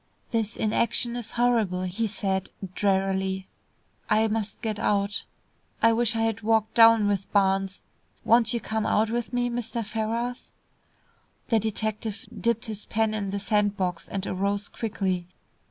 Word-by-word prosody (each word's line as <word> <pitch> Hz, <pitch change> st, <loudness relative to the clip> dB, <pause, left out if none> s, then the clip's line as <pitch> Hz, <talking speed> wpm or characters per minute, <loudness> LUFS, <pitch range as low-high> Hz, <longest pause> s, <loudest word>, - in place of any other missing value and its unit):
"This 225 Hz, -2 st, -1 dB
inaction 235 Hz, +2 st, +1 dB
is 240 Hz, -2 st, -4 dB
horrible," 225 Hz, -7 st, +2 dB
he 190 Hz, +5 st, -1 dB
said, 195 Hz, -2 st, -1 dB, 0.2 s
drearily. 190 Hz, -1 st, 0 dB, 0.6 s
"I 220 Hz, +1 st, +4 dB
must 215 Hz, -1 st, -2 dB
get 215 Hz, -2 st, -2 dB
out. 200 Hz, -1 st, 0 dB, 0.5 s
I 230 Hz, 0 st, +5 dB
wish 235 Hz, 0 st, +1 dB
I 225 Hz, -, 0 dB
had 225 Hz, -1 st, 0 dB
walked 220 Hz, 0 st, +2 dB
down 225 Hz, -2 st, +7 dB
with 200 Hz, -1 st, -1 dB
Barnes. 195 Hz, -1 st, +1 dB, 0.4 s
Won't 230 Hz, -1 st, +4 dB
you 235 Hz, -, 0 dB
come 220 Hz, -1 st, -2 dB
out 220 Hz, +1 st, +2 dB
with 235 Hz, 0 st, -2 dB
me, 245 Hz, -1 st, +1 dB
Mr. 235 Hz, -1 st, -3 dB
Ferrars?" 230 Hz, +3 st, -3 dB, 1.0 s
The 225 Hz, -3 st, +4 dB
detective 220 Hz, 0 st, -2 dB
dipped 235 Hz, 0 st, 0 dB
his 215 Hz, -2 st, -6 dB
pen 220 Hz, 0 st, +1 dB
in 205 Hz, -2 st, -2 dB
the 200 Hz, -, -2 dB
sand 205 Hz, 0 st, +1 dB
box, 180 Hz, -3 st, -2 dB
and 195 Hz, -1 st, -3 dB
arose 200 Hz, +2 st, -1 dB
quickly. 190 Hz, -5 st, -2 dB
215 Hz, 150 wpm, -26 LUFS, 200-230 Hz, 1.0 s, down